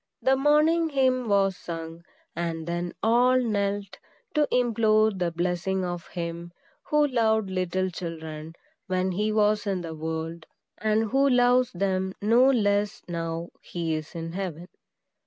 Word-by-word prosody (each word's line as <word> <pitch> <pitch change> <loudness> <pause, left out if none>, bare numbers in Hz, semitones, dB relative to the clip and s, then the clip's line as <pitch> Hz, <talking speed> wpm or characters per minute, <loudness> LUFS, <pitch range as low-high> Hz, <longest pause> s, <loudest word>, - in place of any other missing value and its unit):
The 265 - +3
morning 305 +4 +3
hymn 255 -4 +1
was 195 -1 +3
sung, 165 -1 -7 0.3
and 165 -1 -3
then 175 +1 -3
all 245 +3 +4
knelt 205 -4 -2 0.3
to 300 -2 +2
implore 220 -3 +3
the 180 -3 -1
blessing 180 +2 -1
of 175 -1 -5
him 170 0 -6 0.3
who 300 0 +3
loved 220 -6 +1
little 185 0 -1
children 160 -2 -7 0.3
when 185 0 0
he 210 +4 0
was 210 0 +2
in 190 -2 -1
the 165 -2 -6
world, 160 +1 -5 0.3
and 215 0 +1
who 275 +2 +4
loves 245 0 +4
them 190 0 -1
no 235 +5 +4
less 205 -4 +1
now 165 0 -4
he 165 -2 -3
is 155 +2 -5
in 165 0 -5
heaven. 175 -2 -5
190 Hz, 140 wpm, -26 LUFS, 170-230 Hz, 0.3 s, all